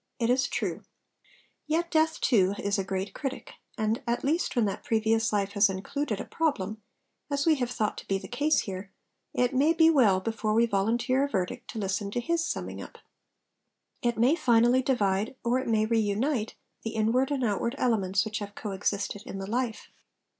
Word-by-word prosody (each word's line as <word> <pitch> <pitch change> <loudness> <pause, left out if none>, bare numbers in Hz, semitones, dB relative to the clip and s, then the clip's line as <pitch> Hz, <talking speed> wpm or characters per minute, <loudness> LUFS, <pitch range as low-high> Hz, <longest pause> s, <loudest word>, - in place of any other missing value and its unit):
It 235 0 +1
is 260 +2 +2
true. - - -3 0.9
Yet 335 +3 0
Death, 320 0 +2
too, 200 -5 +3
is 200 0 -1
a - - 0
great 190 +1 -3
critic; 270 -2 -5 0.3
and, 220 0 0
at 235 +1 0
least 315 +3 0
when 235 -3 +3
that 195 - -3
previous 225 0 +1
life 200 -1 0
has 205 0 +4
included 205 +4 -3
a - - -4
problem, 220 -10 -1 0.5
(as 280 -1 0
we 325 - +5
have 245 -2 -1
thought 215 -4 -2
to - - -13
be 195 - +1
the - - -9
case 290 +6 +2
here), 195 0 -6 0.4
it 245 0 +2
may 290 +5 +4
be 325 -1 +5
well 220 -11 +4
before 215 +1 -1
we 230 +1 +5
volunteer 235 +5 +1
a 285 - -1
verdict 195 +3 -3
to - - -7
listen 200 0 -2
to 225 - -2
his 335 +6 0
summing - - -4
up. - - -10 1.0
It 240 -1 0
may 250 +7 +4
finally 240 -3 +4
divide, 215 -4 0
or 240 +2 +2
it 260 - -4
may 220 -2 +2
reunite, 225 +2 0 0.3
the 225 - -5
inward 230 +5 +2
and 280 -3 -1
outward 235 +3 0
elements 200 -5 +1
which 215 -1 -3
have 205 -1 -7
co 210 - -5
existed 200 +1 -2
in 195 - -6
the 195 - -4
life. 235 +2 -3
225 Hz, 190 wpm, -28 LUFS, 205-260 Hz, 1.0 s, we